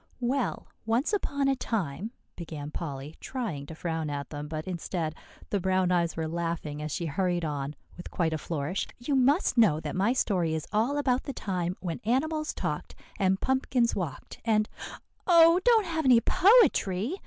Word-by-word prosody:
"Well, 245 - -1 0.2
once 240 - +1
upon 285 -8 0
a 270 - +3
time," 205 - -2 0.3
began 150 -4 -7
Polly, 145 -2 -6
trying 205 - -4
to 160 - -8
frown 160 -2 -3
at 140 -1 -5
them; 145 0 -5
but 155 0 -5
instead, 170 -3 -3 0.4
the 200 - +1
brown 185 0 +1
eyes 170 -2 +1
were 160 -1 -1
laughing 165 -3 -3
as 150 0 -4
she 170 - -2
hurried 175 +2 0
on, 145 -1 -3 0.2
with 175 - -8
quite 165 -3 0
a 155 - -2
flourish. 160 +4 -2
"You 245 +5 -3
must 265 +1 +3
know 175 -10 +5
that 150 -2 -4
my 200 +6 +2
story 180 -10 +1
is 160 - -3
all 235 +7 +2
about 260 -3 +1
the 275 - -4
time 185 -5 -2
when 170 -3 -3
animals 305 +7 0
talked, - - -4 0.2
and 190 -1 +2
pumpkins 260 -2 +1
walked, 175 -8 -5
and" 215 -2 +2 0.6
"Oh, 335 -1 +7
don't 460 -4 +5
have 320 -3 -2
any 250 -3 +7
poetry!" 335 - +4
185 Hz, 175 wpm, -28 LUFS, 160-255 Hz, 0.6 s, Oh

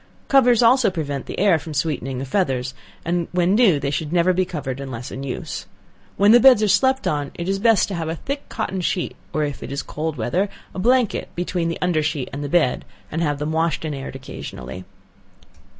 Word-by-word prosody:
Covers 250 -4 +5
also 245 0 +5
prevent 145 -6 -4
the - - -6
air 190 -4 +4
from 155 0 -8
sweetening 135 -3 -1
the 135 - -3
feathers, 130 -6 -1 0.3
and 170 0 0
when 180 +1 +2
new 205 - +5
they 140 - -2
should 150 +1 -3
never 175 +1 +3
be 185 +1 +1
covered 145 -7 -5
unless 130 -3 -6
in 130 - -6
use. 135 -2 -5 0.5
When 205 +2 +6
beds 250 -4 +7
are - - +3
slept 260 +7 +3
on, 145 -2 -1
it 170 - -5
is 195 0 0
best 225 0 +4
to - - -4
have 165 -3 -3
a 165 - -2
thick 280 - -5
cotton 190 -1 -3
sheet, 175 0 -1 0.2
or 155 - 0
if 145 -2 -4
it - - -7
is 140 - -3
cold 155 0 -4
weather, 175 - 0 0.2
a - - -5
blanket 245 +2 +2
between 175 -1 -1
the 165 - -3
under 175 -4 +2
sheet 150 -3 -2
and 145 +1 -4
the 145 - -4
bed, 155 -6 +2 0.3
and 160 - -2
have 145 -3 0
them 150 +2 -3
washed 160 -1 0
and 155 - -2
aired 135 -1 -6
occasionally. 90 - -8
165 Hz, 215 wpm, -22 LUFS, 140-195 Hz, 0.5 s, beds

